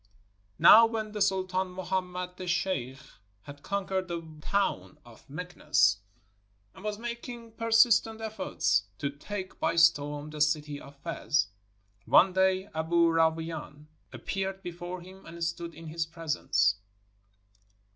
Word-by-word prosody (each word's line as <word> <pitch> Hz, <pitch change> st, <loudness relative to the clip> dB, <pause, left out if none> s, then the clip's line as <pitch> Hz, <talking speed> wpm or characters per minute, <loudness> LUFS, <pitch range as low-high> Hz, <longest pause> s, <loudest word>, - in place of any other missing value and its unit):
Now 225 Hz, +2 st, +9 dB
v/hen 220 Hz, -2 st, -4 dB
the 210 Hz, -1 st, -5 dB
Sultan 190 Hz, -1 st, +1 dB
Muhammed 180 Hz, 0 st, -3 dB
the 185 Hz, 0 st, -7 dB
Sheikh 170 Hz, -8 st, -1 dB, 0.5 s
had 145 Hz, 0 st, -11 dB
conquered 190 Hz, 0 st, -2 dB
the 170 Hz, -1 st, -4 dB, 0.2 s
town 195 Hz, -5 st, -1 dB
of 120 Hz, +3 st, -17 dB
Meknes, 150 Hz, -, +1 dB, 0.8 s
and 190 Hz, -, -14 dB
was 210 Hz, -1 st, -3 dB
making 235 Hz, 0 st, -7 dB
per 230 Hz, +1 st, -5 dB
sistent 225 Hz, -1 st, +4 dB
efforts 215 Hz, -, 0 dB
to 140 Hz, -, -2 dB
take 185 Hz, +6 st, -7 dB
by -, -, 0 dB
storm 150 Hz, -3 st, +3 dB
the 150 Hz, -1 st, -5 dB
city 150 Hz, -1 st, 0 dB
of 140 Hz, -, -13 dB
Fez, 150 Hz, -, -1 dB, 0.6 s
one 185 Hz, +1 st, +6 dB
day 190 Hz, +1 st, +2 dB
Aboo 165 Hz, +1 st, +2 dB
Rawain 160 Hz, -2 st, -1 dB, 0.3 s
appeared 195 Hz, 0 st, -4 dB
before 175 Hz, +1 st, -6 dB
him 190 Hz, +2 st, -13 dB
and 170 Hz, 0 st, -7 dB
stood 170 Hz, 0 st, -3 dB
in 165 Hz, +1 st, -11 dB
his 165 Hz, +1 st, -3 dB
presence. 150 Hz, -, +1 dB
175 Hz, 130 wpm, -29 LUFS, 155-195 Hz, 0.8 s, Now